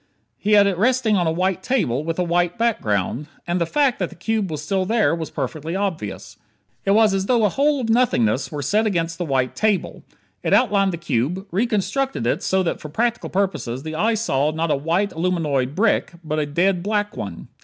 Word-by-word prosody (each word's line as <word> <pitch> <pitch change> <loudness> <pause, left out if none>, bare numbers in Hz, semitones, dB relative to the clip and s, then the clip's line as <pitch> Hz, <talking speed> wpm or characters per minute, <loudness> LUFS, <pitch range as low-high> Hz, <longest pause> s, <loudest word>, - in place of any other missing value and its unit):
He 210 +1 +1
had 205 -1 +7
it 195 -3 0
resting 245 -1 +2
on 175 -3 +1
a - - +2
white 185 +2 0
table, 155 - 0
with 165 +1 -3
a 180 - +1
white 175 +1 0
background. 135 - 0 0.2
And 175 +1 -1
the 170 - +1
fact 280 - +1
that 180 - -1
the - - -13
cube 215 +2 -1
was 155 -1 -5
still 190 +3 0
there, 220 +1 +2
was 165 -2 -3
perfectly 155 +5 -4
obvious. 155 - -4 0.5
It 195 - +2
was 215 -2 +5
as 195 0 -1
though 235 -4 +3
a - - +3
hole 285 +5 +1
of 235 - -2
nothingness 180 - +2
were 145 -2 -4
set 215 +10 +2
against 165 -4 -1
the 175 - -1
white 130 -4 0
table. 215 -3 0 0.4
It - - +2
outlined 200 -6 +3
the 170 - -4
cube; 170 - -1
reconstructed 240 +6 0
it - - 0
so 190 0 +1
that 170 - -2
for 155 - -7
practical 235 +9 -1
purposes 160 -10 -2
the 155 0 -5
eye 220 +8 +1
saw 150 -10 +1
not 160 +1 -1
a - - +3
white, 170 +8 0
aluminoid 155 -6 0
brick, 210 -3 +1
but 155 -1 -2
a 150 - -1
dead 175 +5 +1
black 210 +1 -1
one. - - -6
185 Hz, 210 wpm, -22 LUFS, 155-215 Hz, 0.5 s, had